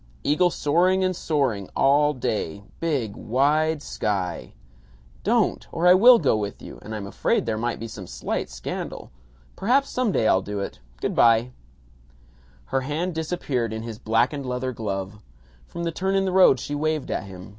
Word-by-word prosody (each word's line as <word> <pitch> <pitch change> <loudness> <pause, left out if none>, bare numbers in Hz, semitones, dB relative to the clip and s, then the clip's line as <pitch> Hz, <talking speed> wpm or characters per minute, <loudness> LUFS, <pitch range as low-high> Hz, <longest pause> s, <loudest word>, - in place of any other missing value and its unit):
Eagle 175 +5 +3
soaring 180 +5 +2
and 185 0 0
soaring 130 - -1
all 145 +2 +4
day 105 - -3 0.2
big 140 -11 -1
wide 150 +5 +1
sky 90 -9 -3 0.4
" - - -28
"Don't! - - +1
Or 170 +1 -1
I 180 - +8
will 235 +6 +8
go 140 - +2
with 105 -2 -4
you, - - -10
and 110 - -7
I'm 105 -2 -5
afraid 100 - 0
there 110 -1 -1
might 120 +2 -2
be 115 - -5
some 100 -4 -9
slight - - -3
scandal. - - -6 0.4
Perhaps 265 +7 +1
some 250 -4 0
day 110 - +1
I'll 95 - +4
do 100 +1 -5
it. 100 - -5 0.2
Good - - -1
by." 115 +1 +4 1.2
Her 135 - +2
hand 155 +7 -2
disappeared 155 -8 -2
in 110 0 -5
his 115 -2 -7
blackened 125 +5 0
leather 125 +1 -2
glove. 105 -3 -5 0.5
From 170 - -6
the 170 - -1
turn 190 +4 -1
in 195 0 +2
the 190 - 0
road 185 -8 +6
she 145 - -5
waved 155 -1 -1
at - - -2
him. 95 0 -10
130 Hz, 175 wpm, -24 LUFS, 105-165 Hz, 1.2 s, I